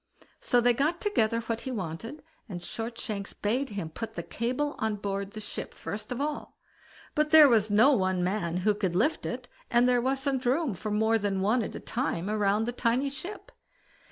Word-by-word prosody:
So 245 - +2
they 240 0 +4
got 305 +8 0
together 230 - +1
what 230 0 -3
he 265 - -5
wanted, 225 - -5 0.3
and 180 -3 -5
Shortshanks 215 +1 -5
bade 250 +7 -1
him 195 -6 -5
put 225 +5 -6
the - - -4
cable 255 +6 -2
on 220 -1 0
board 200 -1 -3
the 215 - -6
ship 210 - -5
first 210 +2 -6
of 250 - -3
all; 295 +1 -4 0.6
but 300 0 +1
there 310 -1 +9
was 220 -4 +3
no 220 +7 +6
one 185 -7 +1
man 180 -2 -1
who 210 - +5
could 195 -4 -2
lift 240 - +1
it, - - -5 0.2
and 240 +1 +4
there 245 -1 +3
wasn't 265 +1 0
room 270 +1 +1
for 215 +4 -5
more 220 +2 +2
than 200 -2 -1
one 220 +5 +2
at 215 - -5
a - - -5
time 210 -6 -2
round 210 0 +2
the 240 - -1
tiny 250 +3 0
ship. 350 +10 -7
225 Hz, 195 wpm, -28 LUFS, 205-260 Hz, 0.6 s, there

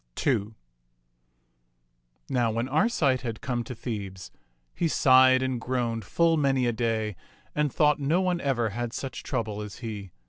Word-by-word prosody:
"] - - -5
II 110 -5 +1 1.7
Now 120 -3 +1
when 115 +3 -1
Arcite 145 - +2
had 115 -4 -4
come 120 -2 -2
to 125 - -7
Thebes, 100 -6 -6 0.4
he 170 - 0
sighed 130 -3 +5
and 130 -2 -2
groaned 120 -4 -2
full 165 - +2
many 135 -3 +2
a 120 - +2
day 110 -3 -1 0.4
and 150 -2 0
thought 150 +1 +3
no 150 +5 +2
one 180 -2 0
ever 120 -5 0
had 120 +3 -4
such 135 -2 -5
trouble 110 -5 -3
as 105 -2 -7
he. 105 -4 -6
125 Hz, 160 wpm, -27 LUFS, 110-140 Hz, 1.7 s, sighed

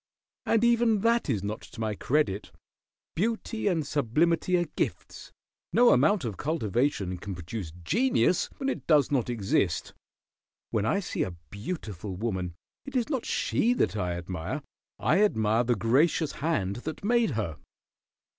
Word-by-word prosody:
"And 225 0 +3
even 235 -3 +4
that 230 -4 +2
is 105 -7 0
not 105 +2 -3
to - - -13
my 110 -1 -1
credit. 115 -3 0 0.6
Beauty 220 +3 -1
and 165 -6 +1
sublimity 160 +7 +2
are 175 - +1
gifts. - - -4 0.4
No 240 0 +6
amount 155 +5 +3
of 110 -5 -4
cultivation 120 - -1
can 100 0 -5
produce 90 0 -6
genius 230 - +2
when 275 - -3
it 270 - -3
does 150 -5 +4
not 130 -4 +1
exist. 100 -6 0 0.8
When 110 0 0
I 200 - +2
see 180 - -3
a 90 - -2 0.2
beautiful 105 - -5
woman 95 -4 -3 0.3
it 275 -1 -9
is 245 0 +1
not 265 -6 -2
she 240 +2 +1
that 245 - +1
I 90 -4 -1
admire. 90 - -4 0.3
I 195 - +2
admire 110 - +2
the 120 0 +2
gracious 140 +7 +2
Hand 120 - -1
that 155 +9 -6
made 235 0 +3
her." 85 -9 -2
135 Hz, 150 wpm, -28 LUFS, -, 0.8 s, No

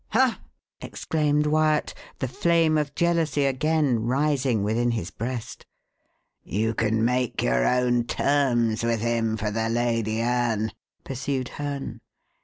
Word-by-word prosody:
"Ha!" 255 +1 +3 0.4
exclaimed 150 -1 0
Wyat, 155 0 +2 0.2
the 130 - -2
flame 165 +4 +2
of 150 -2 -1
jealousy 165 -4 +1
again 140 -2 +1
rising 130 -2 +1
within 115 +4 +1
his 100 -7 -3
breast. 120 +3 -6 0.7
"You 110 +4 -1
can 110 0 +1
make 125 0 0
your 60 0 +2
own 125 -1 +2
terms 120 -6 +1
with 115 -2 0
him 115 -1 0
for 105 -1 -2
the 110 +1 -1
Lady 115 -2 0
Anne," 115 -2 0 0.3
pursued 135 -1 -3
Herne. 145 -1 -5
125 Hz, 125 wpm, -25 LUFS, 115-145 Hz, 0.7 s, Ha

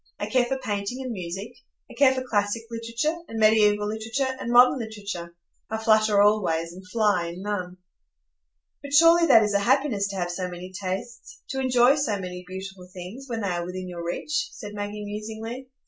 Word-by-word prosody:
I - - -3
care 255 -1 +2
for 265 +2 -2
painting 215 -1 -3
and 255 - -4
music; 190 +3 -5 0.3
I - - -13
care 265 +2 +5
for 260 - -2
classic 205 0 0
literature, 230 +7 -2
and 225 - -5
mediæval 210 -1 +4
literature, 225 +5 -2
and 235 - -3
modern 250 +2 +6
literature; 200 -6 -6 0.3
I 220 - -2
flutter 215 -2 +3
all 210 +1 +5
ways, 165 -2 -1
and 185 +2 -11
fly 205 -5 +2
in 175 +3 -7
none." 185 -3 -3 1.0
"But 280 0 -8
surely 335 +3 +7
that 225 -6 +7
is 210 -1 0
a 200 - +3
happiness 245 -3 +2
to 200 - -6
have 175 -2 -2
so 180 +1 -3
many 180 +1 -9
tastes,—to 235 - -6
enjoy 255 +1 +4
so 260 -8 0
many 180 -1 -6
beautiful 190 0 -8
things, 185 +9 -9
when 230 -2 -3
they 200 - -1
are 175 -1 -1
within 185 +1 -6
your 175 -1 -6
reach," 300 - -2
said 210 -2 -8
Maggie, 205 0 -5
musingly. 220 +4 -6
210 Hz, 190 wpm, -25 LUFS, 185-240 Hz, 1.0 s, surely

